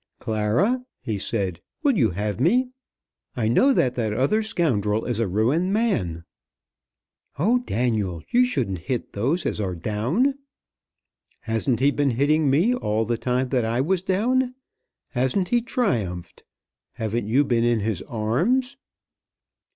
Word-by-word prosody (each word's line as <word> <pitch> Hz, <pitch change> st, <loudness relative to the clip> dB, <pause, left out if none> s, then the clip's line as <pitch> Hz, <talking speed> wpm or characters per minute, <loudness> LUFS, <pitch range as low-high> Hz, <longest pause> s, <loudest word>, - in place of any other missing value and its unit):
"Clara," 115 Hz, -, 0 dB, 0.2 s
he 105 Hz, -3 st, -3 dB
said, 95 Hz, -5 st, -2 dB, 0.2 s
"will 280 Hz, -4 st, +3 dB
you 120 Hz, -, +3 dB
have 105 Hz, +3 st, -3 dB
me? 245 Hz, -, +3 dB, 0.7 s
I 115 Hz, -3 st, 0 dB
know 250 Hz, -, +4 dB
that 130 Hz, -, +2 dB
that 110 Hz, -4 st, -1 dB
other 140 Hz, -, +2 dB
scoundrel 115 Hz, -, 0 dB
is 120 Hz, -2 st, -1 dB
a 115 Hz, -, +1 dB
ruined 130 Hz, -, +1 dB
man." 95 Hz, -, 0 dB, 1.1 s
"Oh, 220 Hz, -, +3 dB
Daniel, 110 Hz, -, -1 dB
you 245 Hz, +1 st, +5 dB
shouldn't 125 Hz, -, -1 dB
hit 125 Hz, -3 st, -2 dB
those 140 Hz, -, 0 dB
as -, -, -1 dB
are 95 Hz, -3 st, -2 dB
down." 125 Hz, -, 0 dB, 1.0 s
"Hasn't 115 Hz, +2 st, -1 dB
he 140 Hz, +2 st, +4 dB
been 145 Hz, -1 st, +1 dB
hitting 145 Hz, +4 st, +2 dB
me 170 Hz, -, +3 dB
all 110 Hz, -, -1 dB
the 120 Hz, +2 st, 0 dB
time 125 Hz, +1 st, 0 dB
that 125 Hz, -3 st, +1 dB
I 115 Hz, +2 st, -1 dB
was 175 Hz, +6 st, +1 dB
down? 245 Hz, +7 st, 0 dB, 0.5 s
Hasn't 130 Hz, +9 st, 0 dB
he 240 Hz, 0 st, +3 dB
triumphed? 110 Hz, -, -2 dB, 0.5 s
Haven't 110 Hz, 0 st, -3 dB
you 130 Hz, +6 st, +3 dB
been 120 Hz, -3 st, +1 dB
in 120 Hz, -2 st, +2 dB
his 105 Hz, -3 st, -2 dB
arms?" 185 Hz, -, 0 dB
125 Hz, 145 wpm, -24 LUFS, -, 1.1 s, you